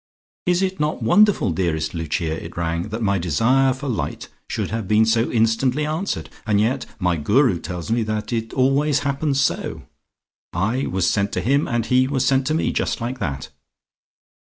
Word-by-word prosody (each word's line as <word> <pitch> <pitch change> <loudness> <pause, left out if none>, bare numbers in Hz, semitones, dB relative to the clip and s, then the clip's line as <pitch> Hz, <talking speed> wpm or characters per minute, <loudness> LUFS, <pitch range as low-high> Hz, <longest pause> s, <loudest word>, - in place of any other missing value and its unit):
"Is 180 +1 +2
it 190 0 -2
not 150 -4 -1
wonderful, 205 - +4
dearest 80 -2 -1
Lucia," 80 0 -2
it 85 +1 -10
ran, 85 +3 -2
"that 110 +2 -4
my 100 -2 +1
desire 120 - +2
for 135 +3 -5
light 120 -5 -3 0.2
should - - -3
have 110 -3 -3
been 110 +2 +4
so 115 +1 +2
instantly 125 +5 +1
answered? 160 +6 -2 0.2
And 105 -1 +3
yet 120 +5 0
my 90 -4 0
Guru 95 - +2
tells 90 +4 -6
me 115 +1 +2
that 110 +1 -3
it 115 -1 -2
always 135 +2 +2
happens 140 0 0
so. - - -1 0.7
I 110 - 0
was 95 -2 0
sent 100 -1 +1
to - - 0
him, 140 +5 +2
and 120 -1 -1
he 130 +2 +3
was 135 -1 0
sent 135 0 +2
to 155 - +1
me, 160 - 0
just - - -1
like 125 +2 -4
that! 70 -8 -4
115 Hz, 185 wpm, -21 LUFS, 95-135 Hz, 0.7 s, wonderful